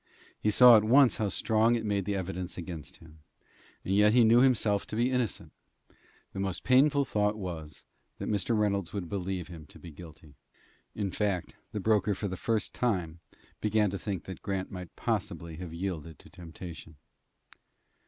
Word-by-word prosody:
He 105 - +2
saw 120 +2 +8
at 105 - +2
once 125 +2 +5
how 105 -2 0
strong 110 +4 +2
it 115 -2 -3
made 100 -2 -1
the 100 - -1
evidence 90 -2 -5
against 85 -5 -7
him, 80 -1 -17 0.7
and 95 - -1
yet 105 +1 +5
he 125 -1 +6
knew 115 +2 +6
himself 115 -6 +2
to - - -6
be 120 +3 +1
innocent. 125 -6 -2 0.8
The - - -5
most 95 -2 -3
painful 140 +2 +4
thought 105 -2 0
was, 85 -6 -7 0.3
that - - -5
Mr. 110 +2 0
Reynolds 100 -4 0
would 100 -4 -4
believe 95 -3 -3
him 80 -3 -10
to - - -15
be 85 - -11
guilty. 80 -2 -13 0.6
In 100 -3 -2
fact, 100 -4 -2 0.2
the 105 - -3
broker 105 -1 +2
for 100 - -3
the 95 - -4
first 110 +3 -1
time 90 -9 -1 0.4
began 105 -2 +1
to 100 - -4
think 100 -5 -4
that 95 - -9
Grant 95 -1 -3
might 90 -2 -8
possibly 85 -2 -3
have 90 -2 -7
yielded 85 -3 -5
to - - -17
temptation. 85 -1 -10
100 Hz, 175 wpm, -29 LUFS, 90-110 Hz, 0.8 s, saw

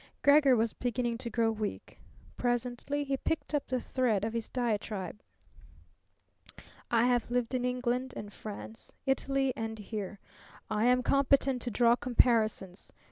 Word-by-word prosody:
Gregor 285 -2 +6
was 225 -1 +1
beginning 240 -1 -1
to 235 0 -5
grow 225 0 +1
weak. 215 -2 -5 0.4
Presently 245 +4 -1
he 275 -1 -1
picked 320 +2 -2
up 295 - 0
the 255 0 0
thread 235 -6 0
of 225 - -3
his 230 -1 -3
diatribe. 210 -5 -2 1.7
"I 235 0 +3
have 245 -2 +2
lived 245 0 -1
in 250 -1 0
England, 250 +1 -1 0.2
France, 215 +1 -9
Italy, 270 0 +1
and 225 -3 -4
here. 210 -1 -6 0.5
I 215 +1 +1
am 250 +1 +4
competent 275 -1 +3
to 245 - -2
draw 235 +1 +4
comparisons. 225 -6 +1
240 Hz, 135 wpm, -31 LUFS, 225-255 Hz, 1.7 s, Gregor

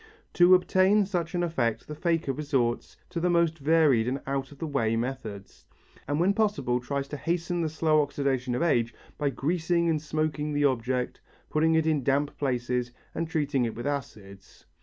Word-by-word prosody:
To 180 +1 +7
obtain 190 +3 +3
such 175 -3 -3
an 175 - +1
effect 130 -10 -1
the 150 - -6
faker 165 -2 0
resorts 130 -5 -1
to 175 - -2
the 180 +2 +1
most 170 -2 +2
varied 145 -6 +3
and 130 +2 -1
out 135 0 -3
of 145 - -13
the 160 - -4
way 115 -7 0
methods, 115 -5 -5 0.4
and 145 +2 0
when 185 +4 +3
possible 200 - +1
tries 140 +2 -3
to 145 - -5
hasten 175 +3 -1
the 160 - 0
slow 155 0 +2
oxidation 135 -3 -1
of 145 - 0
age 120 -8 +1 0.2
by 145 -2 +1
greasing 170 +5 0
and 155 -2 -1
smoking 150 -1 -2
the 145 0 +2
object, 125 -1 -1 0.3
putting 160 +1 +3
it 160 -1 +2
in 155 -4 +1
damp 140 +3 +1
places 125 -2 -1 0.2
and 165 0 -3
treating 145 -5 0
it 115 -2 -2
with 120 - -6
acids. 105 -9 -6
145 Hz, 180 wpm, -27 LUFS, 125-165 Hz, 0.4 s, To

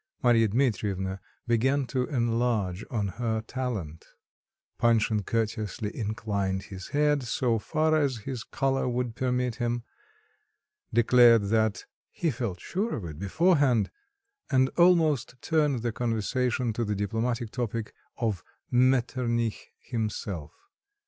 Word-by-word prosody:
Marya 115 -2 +5
Dmitrievna 100 -5 0 0.3
began 130 +4 +2
to 125 +1 -1
enlarge 115 -7 0
on 105 -5 -1
her 110 +2 -2
talent; 110 -13 -4 0.8
Panshin 110 -2 +3
courteously 110 -1 -2
inclined 100 -3 -2
his 95 -1 -9
head, 150 0 +2
so 120 -1 0
far 155 +7 +1
as 140 -5 +1
his 130 -4 -4
collar 135 -1 0
would 120 -1 -2
permit 125 -2 -1
him, 120 -1 -1 1.1
declared 115 -2 +5
that, 110 -3 +1 0.2
"he 165 - -1
felt 115 -7 -4
sure 210 - -2
of 100 - -5
it 75 -2 -7
beforehand," 140 - +2 0.6
and 130 -1 +3
almost 160 -8 +3
turned 150 -7 +1
the 120 - 0
conversation 120 +1 -1
to 115 - -1
the 105 -2 -1
diplomatic 115 +3 -2
topic 115 -3 -3 0.2
of 105 -8 -1 0.3
Metternich 120 -2 +1
himself. 105 - -4
120 Hz, 115 wpm, -28 LUFS, 110-130 Hz, 1.1 s, Marya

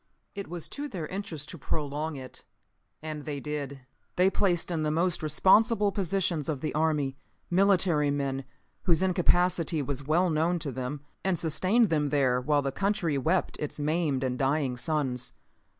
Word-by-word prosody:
It 200 -2 -6
was 170 -1 -6
to 290 +1 -4
their 180 - -5
interest 165 -5 -5
to 170 - -8
prolong 150 +2 -3
it, 130 -2 -9 0.6
and 155 -2 -5
they 145 -2 -4
did. 140 -2 -5 0.3
They 185 +2 +4
placed 180 -3 +1
in 165 -2 -1
the 155 - +1
most 170 +3 +1
responsible 205 - +4
positions 185 -5 -1
of 150 -4 -1
the 155 - -2
army, 150 -3 0 0.3
military 180 -5 +3
men 135 -1 -1 0.4
whose 170 0 +3
incapacity 175 -3 +2
was 140 0 -2
well 175 +3 +3
known 165 +3 +2
to 150 -4 -3
them, 130 +3 -4 0.2
and 190 -2 +1
sustained 185 +8 +2
them 150 -3 +1
there 130 -3 +2
while 145 +2 +2
the 135 - -1
country 175 -4 0
wept 170 +7 0
its 150 0 -4
maimed 150 -3 0
and 125 -1 -1
dying 135 -1 +1
sons. 125 -3 -2
155 Hz, 165 wpm, -28 LUFS, 140-180 Hz, 0.6 s, They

